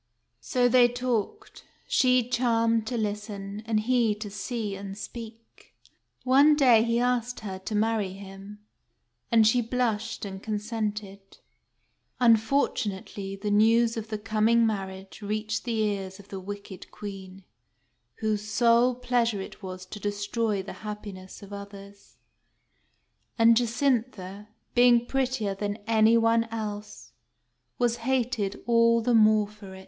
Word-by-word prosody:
So 250 -2 +1
they 245 0 +6
talked, 245 - -3 0.2
she 250 -2 +3
charmed 230 -2 +1
to 245 - -2
listen, 210 -1 -4
and 215 -2 +1
he 235 -2 +2
to 210 -1 -7
see 210 0 -4
and 195 0 -7
speak. 225 0 -11 0.5
One 280 +4 +5
day 250 -6 +5
he 230 +1 +1
asked 245 0 -1
her 190 -3 -6
to 210 +3 -5
marry 215 -3 0
him; 195 +2 -11 0.7
and 225 -2 +5
she 240 +3 +4
blushed, 225 -2 -2
and 190 -1 -7
consented. 210 -2 -4 0.8
Unfortunately, 220 -5 +1
the 205 +1 -3
news 225 +2 +4
of 225 -1 -5
the 215 -1 -3
coming 225 +2 +2
marriage 195 -2 -4
reached 215 +2 -3
the 235 - -2
ears 195 -3 -2
of 200 -1 -16
the 195 - -6
wicked 200 0 -9
Queen, 195 -2 -9 0.8
whose 215 -2 0
sole 235 +3 +3
pleasure 240 -3 0
it 190 - -9
was 185 -1 -7
to 210 - -9
destroy 205 0 -2
the 195 - -8
happiness 205 -3 -8
of 200 0 -11
others; 200 0 -11 1.2
and 230 0 +6
Jacintha, 230 -5 -1 0.3
being 240 -1 +5
prettier 255 -6 -1
than 205 +1 -3
any 225 +1 +4
one 230 0 +3
else, 215 -2 -7 0.7
was 240 -1 +1
hated 235 -5 -1
all 230 0 +4
the 245 +1 +1
more 215 -2 +5
for 205 -2 -12
it. - - -11
220 Hz, 135 wpm, -27 LUFS, 205-235 Hz, 1.2 s, they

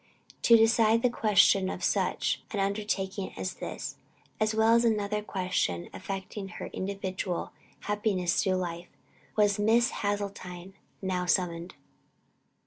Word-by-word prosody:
To 230 - +7
decide 225 0 +4
the 250 - +3
question 195 -4 +4
of - - -5
such - - 0
an 205 - -3
undertaking 195 -1 -2
as 95 -1 -3
this, - - -6 0.4
as 215 0 +1
well 220 +1 +4
as 235 0 +5
another 210 -2 +1
question 180 - -1
affecting 195 +1 -5
her 190 - -7
individual 190 -2 -3 0.3
happiness 205 -4 0
through 190 -2 +1
life, 175 -1 -4 0.5
was 205 -1 +3
Miss 230 +4 +3
Hasseltine 195 -3 -4 0.3
now 180 -1 -1
summoned. 175 -1 0
200 Hz, 125 wpm, -29 LUFS, 185-215 Hz, 0.5 s, To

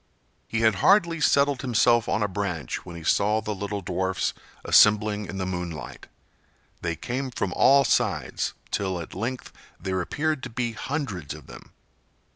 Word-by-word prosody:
He 115 - -1
had 110 -1 +5
hardly 170 -5 +4
settled 140 -2 +3
himself 120 -2 +3
on 110 - +1
a - - +1
branch 90 -5 -3
when 85 - -8
he 85 - -8
saw 105 +6 +2
the 105 -1 -3
little 100 +1 -4
dwarfs 95 +1 -1 0.3
assembling 105 -1 +4
in 100 - -6
the 95 - -2
moonlight. 90 -6 -5 0.7
They 85 -1 -2
came 130 +8 -3
from 100 -6 -3
all 140 +1 +5
sides, 125 - 0 0.2
till 95 -3 -1
at 80 - -8
length 120 +6 -4 0.3
there 95 -1 -2
appeared 155 - -1
to - - -6
be 120 0 -2
hundreds 115 - -4
of - - -13
them. - - -13
105 Hz, 160 wpm, -25 LUFS, 95-125 Hz, 0.7 s, had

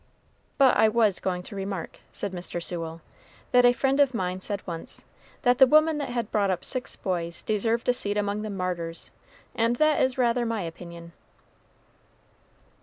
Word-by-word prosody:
"But 270 -2 +5
I 220 - +5
was 215 -4 +2
going 180 -1 -2
to 200 - -10
remark," 195 -2 -5
said 200 - -4
Mr. 175 -1 -5
Sewell, 165 -1 -3 0.5
"that 245 0 +6
a 245 - +7
friend 270 +2 +1
of 275 -3 +4
mine 185 -2 -2
said 200 +1 -4
once, 165 -3 -7 0.4
that 245 -1 +3
the 265 - +9
woman 310 +2 +4
that 280 -3 -3
had 235 -3 -3
brought 205 -2 +2
up 185 -2 -1
six 255 -1 -4
boys 170 -2 -3
deserved 225 +2 0
a 250 - +4
seat 205 -4 -2
among 205 0 -1
the 215 - -4
martyrs; 180 -4 -3 0.4
and 230 +1 +1
that 310 +3 +3
is 260 0 +1
rather 240 -1 +2
my 225 -4 -2
opinion." 170 0 -9
205 Hz, 175 wpm, -26 LUFS, 180-245 Hz, 0.5 s, the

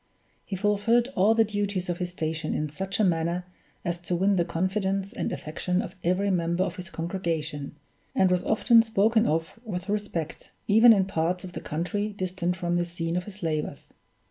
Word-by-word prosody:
He 195 - -5
fulfilled 210 +5 +2
all 205 +4 +4
the 225 - +5
duties 205 -3 -2
of 175 0 -2
his 180 -1 -2
station 160 -2 -3
in 150 0 -1
such 190 +8 -3
a - - +4
manner 170 0 +1 0.4
as 175 -1 -1
to 175 0 -2
win 195 +3 +3
the 175 - +3
confidence 190 +4 -1
and - - -2
affection 180 +4 -2
of 225 - -4
every 190 +3 +2
member 170 0 +1
of - - -4
his 180 -1 -6
congregation, 165 -5 -3 0.4
and 190 -1 +4
was 180 -1 +2
often 230 +1 +5
spoken 225 +1 +3
of 165 +7 -1
with 190 -4 -5
respect, 200 -6 -3
even 225 +3 +8
in 195 -4 +5
parts 180 0 -1
of 180 -2 -8
the - - -5
country 205 +7 -2
distant 185 -2 -2
from 175 -1 -1
the 175 - +1
scene 170 -1 -3
of 180 0 -1
his 205 -2 -10
labors. 155 -2 -3
185 Hz, 190 wpm, -27 LUFS, 170-205 Hz, 0.4 s, even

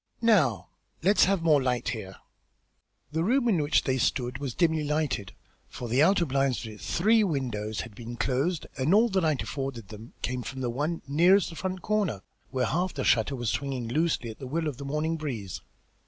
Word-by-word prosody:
"Now 175 - +3 0.3
let 200 +3 +4
us - - +8
have 190 -2 +1
more 155 -4 +5
light 125 -2 0
here." 95 -5 -5 1.0
The 160 +2 0
room 245 +5 +2
in 190 -9 +3
which 145 +1 +2
they 130 -1 0 0.2
were 125 -1 -3
was 135 -4 -4
dimly 160 -3 +2
lighted, 145 -10 -1 0.4
for 120 - -6
the 125 +4 +2
outer 175 +2 +4
blinds 135 -3 0
of 110 - -7
its 105 - -4
three 215 +5 +4
windows 115 - -2
had 115 - -9
been 120 +3 -8
closed, 140 +8 0
and 150 +9 +3
all 230 +3 +5
the 190 -2 +1
light 155 -5 +1
afforded 135 -7 -5
them 110 +2 -11
came 125 +1 -2
from 130 +3 -6
the 120 -2 -1
one 150 +7 -2
nearest 175 +7 +4
the - - -9
front 185 +1 -4
corner, 200 - 0 0.3
where 130 -1 0
half 180 +2 -1
the 135 - -2
shutter 125 +4 +2
was 120 -3 -1
swinging 135 -4 -3
loosely 150 -4 0
at 110 - -13
the 130 - -6
will 160 +4 -1
of 145 -5 -4
the 140 - -7
morning 155 +3 -1
breeze. 120 - -5
140 Hz, 205 wpm, -28 LUFS, 120-170 Hz, 1.0 s, us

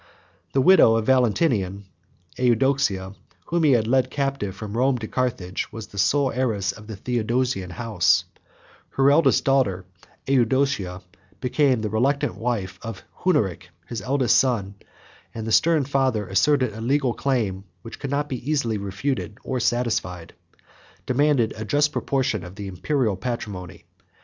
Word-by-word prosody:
The 135 - +3
widow 165 -10 +6
of 115 -1 0
Valentinian, 110 - +1 0.5
Eudoxia, 120 -6 +1 0.3
whom 170 0 0
he 145 -3 +5
had 115 -3 +2
led 130 +3 +2
captive 135 -9 -2
from 105 +1 -7
Rome 130 +2 +2
to 115 -2 -6
Carthage, 110 -9 -2
was 110 -1 -7
the 100 -2 -9
sole 140 +6 +2
heiress 110 -6 0
of 105 0 -13
the 110 - -6
Theodosian 120 -2 -1
house; 105 -3 +1 0.7
her 135 +1 +4
elder 145 -1 +5
daughter, 105 -10 +1 0.4
Eudocia, 130 -7 +1 0.4
became 130 -1 +1
the 110 - -2
reluctant 135 +4 +1
wife 100 -6 -3
of 115 -4 -7 0.2
Hunneric, 105 - 0 0.2
his 110 +3 -5
eldest 130 +1 +2
son; 110 -7 0 0.6
and 110 -1 -5
the 110 - -3
stern 160 +2 +3
father, 130 -6 0
asserting 130 +4 +2
a 110 - -8
legal 130 +1 +1
claim, 110 -9 -1 0.2
which 115 - -9
could 135 - -4
not 145 0 -1
easily 125 -3 -1
be 100 - -6
refuted 105 +3 -3
or 130 - -2
satisfied, 115 -8 -1 0.7
demanded 135 -3 +2
a 110 - -5
just 145 +7 +2
proportion 130 - -1
of 90 +1 -10
the 100 0 -7
Imperial 110 - -1
patrimony. 95 -4 -6
120 Hz, 145 wpm, -23 LUFS, 100-135 Hz, 0.7 s, widow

